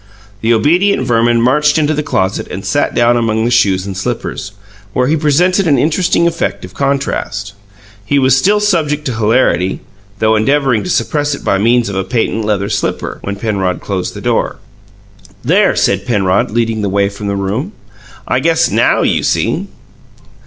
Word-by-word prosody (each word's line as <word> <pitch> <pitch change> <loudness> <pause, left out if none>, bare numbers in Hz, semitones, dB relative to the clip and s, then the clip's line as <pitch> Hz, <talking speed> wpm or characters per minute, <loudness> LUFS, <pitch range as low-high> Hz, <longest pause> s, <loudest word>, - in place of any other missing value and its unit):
The 115 - +1
obedient 160 - +2
Verman 120 -1 +2
marched 150 +5 +3
into 155 -1 +1
the 150 - -1
closet 95 -10 -1
and - - -6
sat - - 0
down 120 0 +3
among 110 -1 0
the 120 - 0
shoes 95 -5 +2
and 100 -1 -5
slippers, 95 +1 -4 0.4
where 125 - +1
he 150 +5 +2
presented 175 +5 +2
an 145 -3 +3
interesting 165 +5 +1
effect 170 - -2
of 90 - -13
contrast. 135 -6 -2 0.5
He 130 +7 0
was 130 -2 +4
still 200 +10 +2
subject 155 -8 0
to 130 - -2
hilarity 105 -5 +1 0.4
though 110 +1 +2
endeavouring 130 0 +1
to - - -4
suppress 145 -4 0
it - - -11
by 100 - +1
means 115 +3 +2
of 100 - -4
a 95 - -1
patent 115 0 -1
leather 100 -2 0
slipper 105 -1 -3
when 100 - -4
Penrod 100 -4 -2
closed 95 -3 -4
the - - -7
door. - - -1 0.9
"There!" - - +3
said 100 0 0
Penrod, 100 -5 +1
leading 115 -1 -1
the 100 - -1
way 100 +1 +1
from 100 +1 -7
the 100 - -1
room. 105 - -3 0.5
"I - - +1
guess - - +2
NOW - - +2
you - - +1
see!" - - -1
115 Hz, 175 wpm, -14 LUFS, 100-145 Hz, 0.9 s, was